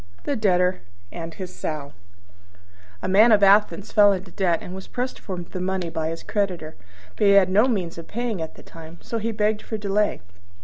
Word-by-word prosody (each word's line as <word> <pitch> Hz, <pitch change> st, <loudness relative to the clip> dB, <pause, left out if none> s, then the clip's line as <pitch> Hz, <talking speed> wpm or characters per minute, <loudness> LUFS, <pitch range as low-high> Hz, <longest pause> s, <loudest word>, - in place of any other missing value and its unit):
THE 285 Hz, -, -1 dB
DEBTOR 185 Hz, -5 st, +2 dB, 0.3 s
AND 165 Hz, -1 st, -7 dB
HIS 185 Hz, -2 st, -7 dB
SOW 145 Hz, -2 st, -5 dB, 1.1 s
A -, -, -1 dB
Man 210 Hz, +5 st, +6 dB
of 205 Hz, -2 st, +5 dB
Athens 205 Hz, +1 st, +4 dB
fell 205 Hz, -1 st, +6 dB
into 185 Hz, -1 st, -6 dB
debt 175 Hz, -3 st, +1 dB
and 180 Hz, -, -9 dB
was 190 Hz, 0 st, -8 dB
pressed 250 Hz, +1 st, -4 dB
for 190 Hz, -3 st, -6 dB
the 175 Hz, +1 st, -6 dB
money 185 Hz, -2 st, -2 dB
by 160 Hz, -1 st, -2 dB
his 165 Hz, 0 st, -6 dB
creditor; 185 Hz, -7 st, -2 dB, 0.4 s
but 210 Hz, -, +2 dB
he 200 Hz, -, +6 dB
had 190 Hz, -2 st, +5 dB
no 210 Hz, +6 st, +5 dB
means 180 Hz, -9 st, -2 dB
of 165 Hz, -, -10 dB
paying 230 Hz, -5 st, -3 dB
at 160 Hz, -, -6 dB
the -, -, -14 dB
time, 165 Hz, 0 st, -12 dB
so 230 Hz, -, -3 dB
he 225 Hz, +1 st, -2 dB
begged 210 Hz, 0 st, 0 dB
for 220 Hz, -, -5 dB
delay. 210 Hz, 0 st, 0 dB
190 Hz, 205 wpm, -23 LUFS, 175-210 Hz, 1.1 s, Man